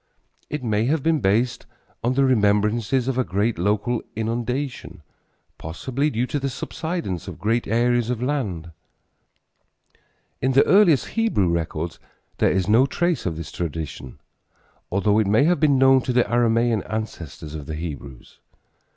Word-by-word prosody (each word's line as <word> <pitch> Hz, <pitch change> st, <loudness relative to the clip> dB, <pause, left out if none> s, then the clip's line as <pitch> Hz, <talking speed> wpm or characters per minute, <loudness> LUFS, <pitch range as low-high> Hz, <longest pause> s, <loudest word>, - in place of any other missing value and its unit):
It 150 Hz, -3 st, -4 dB
may 110 Hz, -1 st, +1 dB
have 145 Hz, +2 st, 0 dB
been 160 Hz, -1 st, +2 dB
based 115 Hz, +3 st, 0 dB, 0.4 s
on 125 Hz, +2 st, +1 dB
the 135 Hz, 0 st, +3 dB
remembrances 110 Hz, +1 st, +2 dB
of 130 Hz, -1 st, 0 dB
a -, -, +3 dB
great 105 Hz, +1 st, -1 dB
local 105 Hz, +5 st, 0 dB
inundation, 115 Hz, -, -3 dB, 0.6 s
possibly 130 Hz, -, -2 dB
due 120 Hz, -3 st, -1 dB
to 145 Hz, -, -2 dB
the 135 Hz, 0 st, -2 dB
subsidence 160 Hz, -, -4 dB
of -, -, -7 dB
great 115 Hz, +3 st, 0 dB
areas 120 Hz, +1 st, +1 dB
of 125 Hz, -2 st, -1 dB
land. 110 Hz, -, -2 dB, 1.7 s
In 130 Hz, +1 st, +1 dB
the 135 Hz, -, +5 dB
earliest 180 Hz, -, +4 dB
Hebrew 225 Hz, -, +1 dB
records 85 Hz, 0 st, -3 dB, 0.4 s
there -, -, +4 dB
is 95 Hz, 0 st, 0 dB
no 115 Hz, +6 st, +5 dB
trace 170 Hz, -, -1 dB
of 80 Hz, -3 st, -3 dB
this 80 Hz, -2 st, -7 dB
tradition, 75 Hz, -5 st, -5 dB, 0.7 s
although 100 Hz, +2 st, +2 dB
it 110 Hz, -, +1 dB
may 110 Hz, +7 st, +4 dB
have 175 Hz, +3 st, +2 dB
been 145 Hz, -4 st, +4 dB
known 135 Hz, 0 st, +5 dB
to 125 Hz, -, -2 dB
the 125 Hz, 0 st, +4 dB
Aramean 115 Hz, -1 st, +2 dB
ancestors 85 Hz, -8 st, -6 dB
of 75 Hz, -3 st, -7 dB
the 80 Hz, -, -4 dB
Hebrews. 70 Hz, -5 st, -8 dB
115 Hz, 150 wpm, -23 LUFS, 95-130 Hz, 1.7 s, the